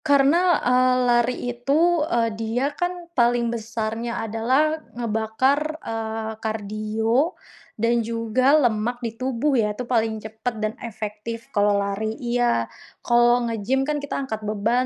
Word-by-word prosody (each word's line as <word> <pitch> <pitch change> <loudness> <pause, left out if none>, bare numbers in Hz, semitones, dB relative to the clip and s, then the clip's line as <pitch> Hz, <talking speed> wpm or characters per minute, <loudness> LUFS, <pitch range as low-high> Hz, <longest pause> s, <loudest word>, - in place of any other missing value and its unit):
Karena, 310 +5 +4
eee, 255 +1 +4
lari 240 0 +3 0.2
itu, 305 +8 +2
eee, 230 -7 +1
dia 225 +6 -1
kan 355 0 -3
paling 240 -3 +2
besarnya 230 +1 -3
adalah 260 +8 +1 0.2
ngebakar, 245 +7 0
eee, 225 -4 -4
kardio 220 - -1 0.4
dan 230 +2 +2
juga 230 +5 +2
lemak 230 +1 0
di 230 -2 -3
tubuh 260 +3 0
ya, 210 -2 +1
itu 245 +4 -5
paling 225 -3 +1
cepat 220 +2 -5
dan 215 0 -2
efektif 225 +1 -6
kalau 205 0 +3
lari 200 +2 -1
iya. 240 - +1 0.4
Kalau 240 0 +4
nge-gym 230 +3 0
kan 300 +1 -1
kita 285 - -4
angkat 220 -5 -4
beban, 220 +4 +1
235 Hz, 135 wpm, -23 LUFS, 220-255 Hz, 0.4 s, Karena